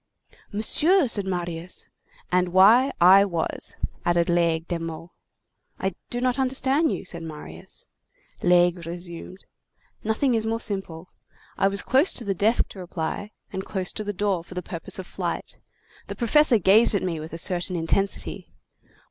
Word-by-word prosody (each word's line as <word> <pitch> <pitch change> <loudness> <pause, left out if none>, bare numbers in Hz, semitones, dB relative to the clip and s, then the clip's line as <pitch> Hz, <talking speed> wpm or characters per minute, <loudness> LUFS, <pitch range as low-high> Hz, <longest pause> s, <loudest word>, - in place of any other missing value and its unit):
"Monsieur!—" 300 - +3
said 205 -4 +1
Marius. 175 -1 -4 0.4
"And 180 0 +2
why 220 +8 +6
I 190 +3 +7
was," 170 -5 -2 0.3
added 175 0 +1
Laigle 170 -1 +1
de 170 -2 -3
Meaux. 165 +1 -7 0.7
"I 190 -1 -2 0.2
do 245 - -3
not 255 +1 0
understand 270 +4 +1
you," - - -4
said 170 -2 -7
Marius. 150 - -10 0.6
Laigle 175 0 +3
resumed:— 175 +2 -7 0.6
"Nothing 220 +4 +1
is 220 -1 0
more 225 0 -1
simple. 190 -6 -3 0.4
I 195 - +2
was 200 0 +2
close 270 +8 +3
to 240 - -2
the 200 - 0
desk 215 +6 +2
to 195 - -11
reply, 180 +3 -5 0.2
and 190 - -3
close 190 -2 -2
to 215 - -4
the 205 - -3
door 195 -3 -1
for 180 - -13
the 180 - -4
purpose 170 -2 -2
of 190 - -6
flight. - - -5 0.5
The - - -6
professor 265 +1 +4
gazed 210 +3 +5
at 200 - 0
me 170 -4 -2
with 155 +1 -8
a 165 - -6
certain 180 +1 0
intensity. 175 +4 -2
190 Hz, 160 wpm, -24 LUFS, 170-220 Hz, 0.7 s, I